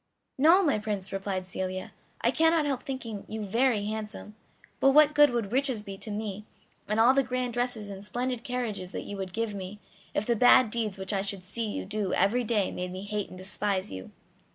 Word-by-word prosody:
"No, 335 +7 +6
my 285 - +2
Prince," 205 -3 -3
replied 195 -1 -2
Celia; 185 0 -4 0.3
"I - - +3
cannot 325 -1 +3
help 275 -3 -1
thinking 230 -7 -5
you 220 0 -5
very 225 +1 +1
handsome; 215 0 -5 0.5
but 270 - +5
what 300 0 +7
good 295 -1 +7
would 230 -4 -2
riches 260 -4 +2
be 200 -2 -7
to - - -5
me, 210 -1 -4 0.4
and 215 +1 0
all 240 +3 +6
the 275 - +4
grand 250 -1 -2
dresses 240 -4 -1
and 195 0 -8
splendid 245 +3 -3
carriages 235 -7 -3
that - - -4
you 205 - -6
would 190 -1 -4
give 225 +2 -2
me, 195 +1 -6 0.4
if 210 - 0
the 235 - +2
bad 245 0 +6
deeds 215 -4 -2
which 190 +2 -3
I 195 - +1
should 195 -1 -3
see 220 +5 -3
you - - -4
do 205 0 -2
every 220 +7 +2
day 210 -4 +1
made 180 0 -4
me 185 +1 -6
hate 205 -1 -3
and 185 - -10
despise 190 - -2
you?" 95 -1 -7
215 Hz, 210 wpm, -28 LUFS, 195-245 Hz, 0.5 s, what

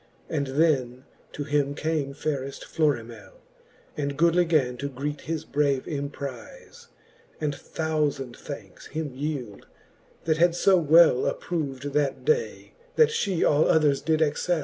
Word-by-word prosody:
And 140 -3 -1
then 130 -3 +1 0.3
to 145 - -4
him 145 -1 0
came 150 -3 -2
fayreft 140 -2 -3
FlorimelU 120 -9 -2 0.6
And 140 -1 -3
goodly 170 +2 +4
gan 145 -7 +1
to 140 +3 -4
greet 145 +3 -4
his 160 0 -4
brave 140 -3 0
emprife, 140 -4 -7 0.5
And 150 -2 -1
thoufand 150 -5 -2
thankes - - -9
him 155 -2 -4
yeeld, 135 -7 -5 0.6
that 160 -1 +1
had 170 +1 +3
fo 190 +1 +5
well 160 -4 +5
Approv'd 145 -4 -3
that 145 -2 0
day, 465 +1 -1 0.2
that 465 -1 +5
fhe 200 - +1
all 150 +1 +4
others 150 -3 +3
did 160 0 +2
excell. 160 +3 0
150 Hz, 135 wpm, -26 LUFS, 140-160 Hz, 0.6 s, fo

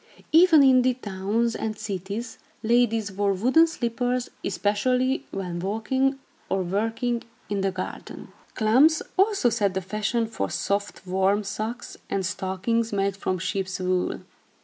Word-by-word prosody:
Even 325 -2 +7
in 260 -1 +6
the 255 0 +2
towns 215 +1 -1
and 215 -1 -3
cities, 210 +3 -5 0.2
ladies 225 -2 +2
wore 200 +1 +1
wooden 260 - +4
slippers, 245 -3 -2
especially 250 +6 0
when 180 -3 -4
walking 225 +8 0 0.3
or 190 -1 0
working 225 +6 -1 0.3
in 200 -1 0
the 195 - +1
garden. 185 0 -7 0.3
Klomps 260 +9 +4
also 390 - +3
set 205 -4 0
the - - +1
fashion 215 +5 -1
for 100 - -3
soft, 200 -1 -2
warm 190 +3 +1
socks, 220 +4 -5
and 195 -1 -1
stockings 205 +4 -1
made 200 -1 0
from 185 -1 -2
sheep's 190 +1 -3
wool. 185 0 -1
215 Hz, 135 wpm, -25 LUFS, 195-245 Hz, 0.3 s, Even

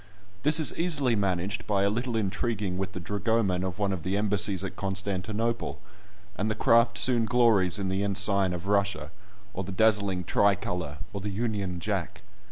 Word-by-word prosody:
This 150 +3 +4
is 150 -7 +1
easily 145 -8 +1
managed 100 0 -1
by 100 -2 +2
a 100 - +3
little 120 +2 -2
intriguing 105 -2 -1
with 95 0 -3
the 95 - -5
dragoman 100 0 0
of 95 -1 -3
one 100 -2 0
of 90 - -4
the 95 +4 -1
embassies 100 -2 +1
at 95 - -5
Constantinople, 100 +4 -2 0.6
and 105 +2 -1
the 110 - -1
craft 115 0 +4
soon 120 -3 +2
glories 110 -7 +3
in 100 -2 -2
the 95 +1 -1
ensign 100 -1 +1
of 90 0 -5
Russia, 100 -1 0 0.4
or 95 - -3
the 95 - -6
dazzling 100 -2 +2
Tricolor, 90 -5 0 0.2
or 100 - -4
the 105 - -3
Union 100 -4 -2
Jack. 95 0 -3
100 Hz, 175 wpm, -28 LUFS, 95-110 Hz, 0.6 s, This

